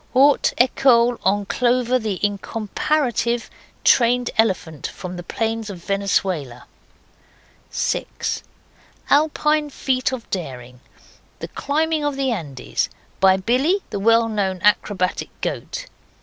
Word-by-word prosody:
Haute 275 +3 +5
ecole, 245 -1 +4
on 200 +2 +1
Clover, 250 +3 +1
the 215 -5 -3
incomparative 235 +4 -1 0.3
trained 245 0 +4
elephant 180 -9 0
from 180 -1 -7
the 175 - -6
plains 225 +4 -3
of 180 -4 -8
Venezuela. 185 -10 -1 1.0
6. - - -2 0.7
Alpine 300 0 +3
feat 260 -2 0
of 255 -3 -6
daring. 125 -8 -5 0.6
The - - -7
climbing 310 +1 -1
of 290 -1 -1
the 270 -1 0
Andes, 145 - -3 0.3
by 190 0 +5
Billy, 265 - +1
the 200 - -2
well 230 +2 +4
known 195 -4 -1
acrobatic 200 -3 +1
goat. - - -4
225 Hz, 110 wpm, -21 LUFS, 190-260 Hz, 1.0 s, Haute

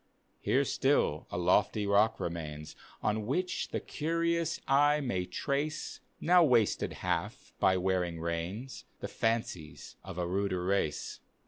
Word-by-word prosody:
Here - - +2
still - - +1
a - - -4
lofty 100 +4 +2
rock 100 +2 +3
remains, 75 -2 -5 0.3
On 105 0 0
which 180 +8 -1
the - - -2
curious 165 +1 -1
eye 145 +2 +4
may 95 -10 -2
trace, 145 +3 -2 0.2
(Now 175 +1 +5
wasted 120 -8 +3
half 90 +8 -2
by 95 0 +4
wearing 90 -2 0
rains,) 85 +10 -4
The - - -4
fancies 110 -9 -3
of 95 -2 -8
a 90 - -1
ruder 95 0 -1
race. 95 -6 -1
100 Hz, 130 wpm, -31 LUFS, 90-135 Hz, 0.3 s, Now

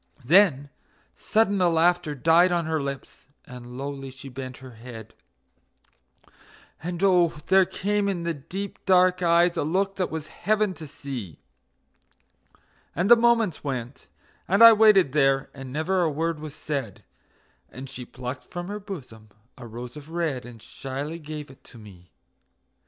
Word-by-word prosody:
Then 150 -4 +4 0.4
sudden 210 -2 +1
the 180 -1 +4
laughter 170 -2 +2
died 165 +6 +4
on 170 -2 0
her 160 -1 -1
lips, 140 -1 -7 0.2
and 125 0 -10
lowly 135 0 -6
she 130 +1 -11
bent 130 0 -8
her 130 -1 -12
head; 115 -1 -11 1.7
And 175 +2 -4
oh, 180 -4 +4
there 190 0 +6
came 205 +1 -1
in 175 -3 -3
the 170 0 -1
deep, 180 +8 -7
dark 185 -1 +4
eyes 170 0 +3
a - - +1
look 190 +6 -1
that 185 - -1
was 160 -2 -5
heaven 210 +4 0
to 160 -3 -10
see; 130 - -7 1.6
And 185 +7 +1
the - - +12
moments 230 -6 +2
went, 130 -3 -5 0.4
and 195 +5 +4
I 230 0 +11
waited 210 -9 +5
there, 135 -2 +2
and 135 -2 -9
never 160 +6 0
a 170 - +2
word 160 +1 -2
was 155 -1 -8
said, 135 -12 -5 0.7
And 130 +3 -9
she 130 -1 -8
plucked 125 +2 -7
from 175 +1 -7
her 205 +1 -4
bosom 125 - -10 0.3
a 120 -2 -11
rose 120 +2 -8
of 150 0 -11
red 160 -7 -3
and 120 -2 -12
shyly 140 +5 -6
gave 150 -2 -8
it 135 - -20
to 120 - -15
me. 95 -5 -15
155 Hz, 155 wpm, -25 LUFS, 130-180 Hz, 1.7 s, the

